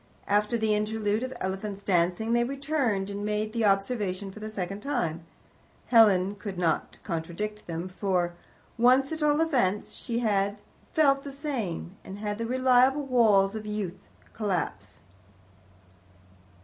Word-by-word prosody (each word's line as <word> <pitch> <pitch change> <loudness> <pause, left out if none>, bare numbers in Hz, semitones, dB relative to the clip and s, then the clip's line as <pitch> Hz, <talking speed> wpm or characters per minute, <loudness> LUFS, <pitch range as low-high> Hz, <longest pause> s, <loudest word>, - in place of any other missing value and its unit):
After 210 +3 +2
the 220 -1 +1
interlude 210 0 0
of 255 0 -3
elephants 195 +1 -4
dancing, 180 +5 +1
they 240 0 +3
returned 265 -7 -1
and 200 0 -4
made 210 +1 -1
the 230 -2 +1
observation 195 -1 0
for 215 - -11
the 215 0 -5
second 195 -1 -4
time. 180 - -2 0.7
Helen 205 -5 +5
could 200 -2 -6
not 170 -2 0
contradict 185 +5 -4
them, 170 +1 -4
for, 185 -2 -1 0.5
once 255 +4 +5
at 320 0 -4
all 295 0 +3
events, 240 - +1
she 235 -3 -4
had 205 -3 +1 0.3
felt 275 -3 +3
the 280 - -6
same, 235 - -4
and 190 - -8
had 205 0 -3
seen 230 - -2
the - - -4
reliable 260 +2 +4
walls 215 -6 +4
of 215 -1 -6
youth 200 -3 -3 0.3
collapse. 185 - -3
210 Hz, 145 wpm, -28 LUFS, 195-245 Hz, 0.7 s, Helen